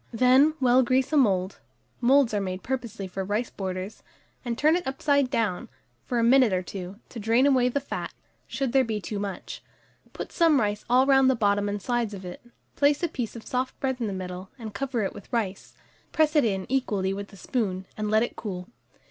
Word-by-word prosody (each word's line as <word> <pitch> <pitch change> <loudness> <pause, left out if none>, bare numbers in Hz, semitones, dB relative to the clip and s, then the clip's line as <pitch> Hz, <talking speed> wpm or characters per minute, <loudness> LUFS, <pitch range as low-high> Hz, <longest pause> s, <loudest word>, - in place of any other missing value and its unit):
Then 255 +6 +4
well 255 0 +5
grease 260 +3 +1
a - - +4
mould 195 -8 +2 0.4
(moulds 260 -1 +4
are 205 - +1
made 185 -1 -4
purposely 235 -5 -4
for 190 +1 -4
rice 210 +5 -2
borders), 185 +1 -5 0.4
and 235 -2 -3
turn 310 +4 +4
it 355 -3 -2
upside 280 0 +1
down 225 -8 -1 0.4
for 245 - -2
a 230 - +2
minute 250 -1 +5
or 185 0 0
two, 185 +2 -7
to 235 - -8
drain 225 +5 +3
away 255 -3 +4
the 280 - 0
fat, 280 - -5 0.4
should 270 -3 -2
there 265 +1 +4
be 220 -3 -2
too 205 +1 -5
much; 200 -1 -6 0.5
put - - -7
some 325 -5 +4
rice 210 -1 -1
all 255 +2 +5
round 270 -1 +5
the 260 - +3
bottom 205 -2 +1
and 205 -1 -4
sides 235 -2 -1
of 190 -1 -9
it; 180 - -8 0.3
place 285 +3 +2
a - - +3
piece 245 -8 -5
of 230 - -9
soft 255 +1 -3
bread 265 -1 -1
in 225 - 0
the - - -3
middle, 185 0 -6
and 220 -4 -8
cover 255 -4 -2
it 195 - -2
with 200 - -12
rice; 210 -6 -3 0.4
press 310 0 +2
it 295 - +5
in 195 -4 -1
equally 205 -8 0
with 200 +1 -5
the 195 - -15
spoon, 190 -4 -2
and 210 -1 -3
let 215 +1 +4
it 240 - -4
cool. 180 -4 -6
230 Hz, 215 wpm, -26 LUFS, 200-265 Hz, 0.5 s, well